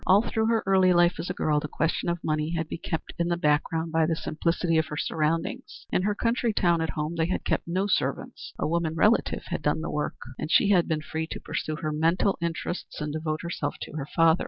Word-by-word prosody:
All 195 +4 +6
through 220 -1 0
her 225 -1 +2
early 190 -1 +5
life 175 0 +4
as 180 - -4
a - - -1
girl, 150 -1 +1
the 150 - -4
question 165 +3 -1
of 170 -1 -2
money 155 +2 0
had 160 -1 -2
been - - -5
kept 160 - -4
in 170 - +1
the 175 0 0
background 160 +1 +1
by 160 0 +3
the 165 - +1
simplicity 165 +1 0
of 160 - 0
her 150 - -5
surroundings. 160 +2 -2
In - - +2
her 205 +2 0
country 230 +1 +1
town 170 -4 +2
at 160 - -1
home 155 +2 -2
they 160 0 +2
had 185 - -2
kept - - 0
no 185 +3 0
servants. 205 - -2
A - - -1
woman 165 0 0
relative 210 +7 +2
had - - -2
done 150 +1 +1
the 165 - -3
work, 150 0 -2 0.2
and - - -3
she 200 +4 +5
had 180 -4 +4
been 155 -1 0
free 160 +1 -3
to - - -6
pursue 155 - -3
her 155 0 -3
mental 165 +6 +2
interests 170 +1 -3
and 150 -1 -3
devote 155 -1 -2
herself 160 -4 -3
to - - -8
her 145 -2 -5
father. 165 0 +5
165 Hz, 240 wpm, -27 LUFS, 155-180 Hz, 0.2 s, All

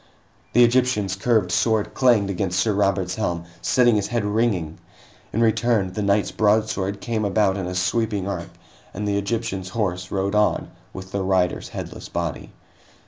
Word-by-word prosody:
The 120 - +6
Egyptian's 120 -6 +2
curved 105 -3 +1
sword 110 +2 +1
clanged 115 -6 +3
against 95 -1 -1
Sir 110 +2 +2
Robert's 95 -2 +1
helm, 85 -6 -2 0.2
setting 120 +3 +3
his 100 - -1
head 120 -3 -1
ringing. 105 -7 0 0.5
In 115 - 0
return, 110 -4 +2
the 105 - -3
knight's 100 0 +1
broadsword 105 -2 +1
came 115 -2 -2
about 100 -1 +2
in 95 -3 -3
a 90 - -4
sweeping 100 +1 0
arc, 100 - -4 0.5
and 105 - -3
the 100 0 +1
Egyptian's 100 -2 -3
horse 90 -4 -1
rode 100 +1 -1
on 105 0 +1 0.2
with 95 0 -9
the 100 - -2
rider's 95 -2 0
headless - - -7
body. 85 -4 -4
100 Hz, 160 wpm, -23 LUFS, 95-110 Hz, 0.5 s, The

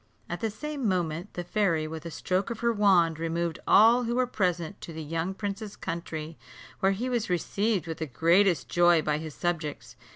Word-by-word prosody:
At 175 - -4
the 225 - -1
same 280 +3 -4
moment, 175 0 -2
the 175 - -3
fairy, 175 -4 +1
with 160 +1 -7
a - - -5
stroke 185 +5 -1
of 235 -1 -5
her 235 0 +2
wand, 180 -6 +3
removed 165 0 -2
all 235 +3 +6
who 235 +1 -1
were 255 0 +3
present 180 -6 -2
to - - -8
the 160 0 -6
young 165 +5 -3
prince's 205 +1 -5
country, 165 -1 -5 0.4
where 195 +1 +3
he 230 +6 -3
was 240 -5 -1
received 195 +2 0
with 160 -1 -6
the 160 - -3
greatest 170 +6 +3
joy 175 -2 +4
by 150 0 0
his 155 -2 -7
subjects. 165 -4 -3
175 Hz, 195 wpm, -28 LUFS, 165-210 Hz, 0.4 s, all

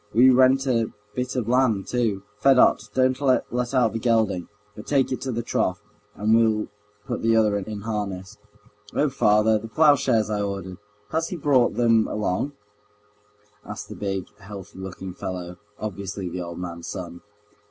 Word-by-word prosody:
We 130 +3 +7
rent 130 +1 +4
a 115 -4 +1 0.2
bit 125 +1 -3
of 120 -4 -1
land 120 -5 +2
too. 110 -6 0 0.2
Fedot, 135 +3 +4
don't 130 +1 +2
let 130 -2 +3 0.3
out 120 -4 +3
the 115 - -2
gelding, 110 -7 +1 0.3
but 105 - -10
take 135 -3 +2
it 130 - -2
to 130 - -3
the 120 0 -2
trough, 95 -4 0 0.4
and 105 +2 +1
we'll 110 -2 +2 0.4
put - - -3
the 115 0 +3
other 110 -2 +3
in 105 +1 -6
harness." 105 -2 -4 0.6
"Oh, 150 - +2
father, 110 -4 +3
the 115 - -8
ploughshares 130 -5 +3
I 105 -1 0
ordered, 100 -2 -4 0.3
has 160 +1 0
he - - -4
brought 140 -6 +2
them 115 -2 +3
along?" 105 +7 -1 1.1
asked - - -8
the - - -7
big, 95 -3 -3
healthy 95 -1 -10
looking 95 0 -7
fellow, 90 -1 -6 0.2
obviously 100 -2 -5
the 90 +1 -5
old 85 -1 -6
man's 85 -2 -6
son. 85 -2 -6
110 Hz, 165 wpm, -24 LUFS, 95-125 Hz, 1.1 s, We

